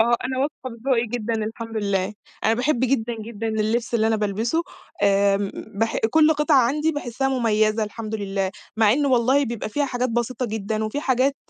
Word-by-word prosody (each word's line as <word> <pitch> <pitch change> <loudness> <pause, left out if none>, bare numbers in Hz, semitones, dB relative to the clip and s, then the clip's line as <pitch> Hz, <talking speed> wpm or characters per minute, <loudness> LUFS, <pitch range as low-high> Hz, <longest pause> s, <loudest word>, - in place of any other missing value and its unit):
آه 235 +2 +4
أنا 260 0 -2
واثقة 275 -2 -3
في 230 - -9
ذوقي 240 -2 +3
جدًا 230 0 -2
الحمد 225 +1 -6
لله، 200 -1 -1 0.3
أنا 225 - +4
باحب 250 +1 0
جدًا، 240 -2 +1
جدًا 225 0 -5
اللبس 220 +3 -1
اللي 220 -1 +3
أنا 225 - +2
بالبسه. 220 - 0 0.4
آمم، 200 0 +3 0.3
بح 225 0 +1
كُلّ 315 0 +5
قطعة 300 -1 +3
عندي 300 +5 +1
باحسِّها 270 -2 -2
مُميَّزة 220 -3 +2
الحمد 215 +1 -6
لله، 195 -2 -2 0.3
مع 220 -1 +5
إنه 285 +2 +1
والله 260 +3 +3
بيبقى 235 -3 -4
فيها 290 +6 0
حاجات 250 -1 -1
بسيطة 240 +1 -1
جدًا، 220 0 -2
وفي 215 +7 -2
حاجات 270 0 +1
230 Hz, 185 wpm, -23 LUFS, 215-260 Hz, 0.4 s, كُلّ